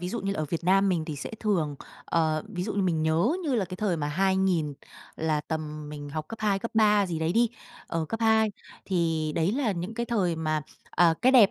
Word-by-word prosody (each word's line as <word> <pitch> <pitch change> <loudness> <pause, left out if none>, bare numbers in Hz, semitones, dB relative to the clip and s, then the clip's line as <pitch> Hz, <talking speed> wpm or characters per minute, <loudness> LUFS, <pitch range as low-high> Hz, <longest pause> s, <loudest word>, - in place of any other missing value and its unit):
ví 180 - -3
dụ 235 +5 -3
như 195 +1 -1
là - - -5
ở - - 0
Việt 170 0 -2
Nam 195 +2 +4
mình 170 -4 +1
thì 155 -2 -5
sẽ 140 - -6
thường, 170 -9 0 0.3
ờ, 155 -1 +1
ví 180 -5 -4
dụ 215 - -2
như 200 - +1
mình 165 -4 +1
nhớ 160 - +2
như 285 -4 +1
là 215 -5 +2
cái 185 0 -7
thời 190 -4 0
mà 145 - -2
2000 190 -2 +1 0.4
là 155 -1 0
tầm 155 -1 -5
mình 145 -1 -7
học 155 +1 -5
cấp 225 - -8
2, 205 -2 +2
cấp 230 - -5
3 210 -2 +4
gì 170 -3 -3
đấy 160 +1 0
đi, 235 +3 +4 0.4
ờ, 165 -1 -2
cấp 225 - -3
2. 220 -1 +4 0.3
Thì 165 -4 0
đấy 165 +4 +1
là 250 -4 +1
những 180 +5 -5
cái 235 +1 -2
thời 190 -8 +1
mà, 155 -1 -1 0.3
à, 170 -2 +4
cái 255 - +5
đẹp 230 -7 +7
180 Hz, 245 wpm, -27 LUFS, 160-210 Hz, 0.4 s, đẹp